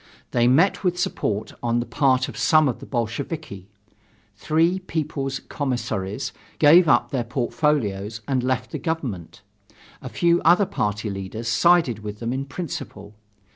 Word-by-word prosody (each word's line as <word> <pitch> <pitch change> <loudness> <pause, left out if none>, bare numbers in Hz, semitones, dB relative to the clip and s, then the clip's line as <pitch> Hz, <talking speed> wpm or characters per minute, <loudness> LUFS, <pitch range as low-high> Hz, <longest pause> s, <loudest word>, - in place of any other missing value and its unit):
They 120 0 +3
met 170 +11 +3
with 180 -1 +1
support 110 - -2
on 120 0 +1
the 120 - -2
part 130 -2 +2
of - - -8
some 155 -2 +4
of 125 - -2
the - - -11
Bolsheviki. 120 - -4 0.7
Three 165 - +1
People's 150 -6 -3
Commissaries 115 -8 -3 0.2
gave 165 +4 +6
up 120 -5 +3
their 130 -4 -1
portfolios 115 -4 -1
and 130 -2 +1
left 125 0 -2
the 155 - -4
government. 130 - -4 0.6
A - - -7
few 170 0 +2
other 175 +5 +5
party 105 - -2
leaders 100 +4 -6
sided 120 - +3
with 105 -1 -7
them 115 +2 -3
in 135 +1 -3
principle. 140 - -7
130 Hz, 145 wpm, -23 LUFS, 110-160 Hz, 0.7 s, gave